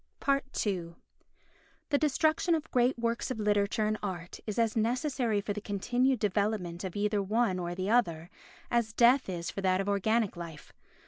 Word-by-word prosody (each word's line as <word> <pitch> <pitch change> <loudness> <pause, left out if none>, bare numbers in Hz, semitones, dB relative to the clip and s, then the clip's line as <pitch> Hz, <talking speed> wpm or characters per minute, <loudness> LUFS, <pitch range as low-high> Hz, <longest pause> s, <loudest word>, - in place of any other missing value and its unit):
ii 175 -5 -2 0.9
The 285 - +2
destruction 315 +3 +2
of 320 0 -5
great 250 +1 +2
works 235 0 -1
of 255 - -4
literature 210 0 +1
and 215 0 -1
art 180 -3 -5
is 210 - -3
as 230 -2 +1
necessary 240 -1 0
for 205 0 -3
the 210 - -5
continued 245 +6 +1
development 200 -4 -1
of 185 -2 -5
either 205 0 +1
one 210 -1 +1
or 175 0 -3
the 190 +3 -2
other 170 -7 +1 0.4
as 235 -2 +1
death 245 +1 +4
is 170 -2 -4
for 195 - -5
that 185 -1 +2
of 195 - -2
organic 210 +1 +1
life. 170 -3 -9
210 Hz, 170 wpm, -30 LUFS, 190-235 Hz, 0.9 s, death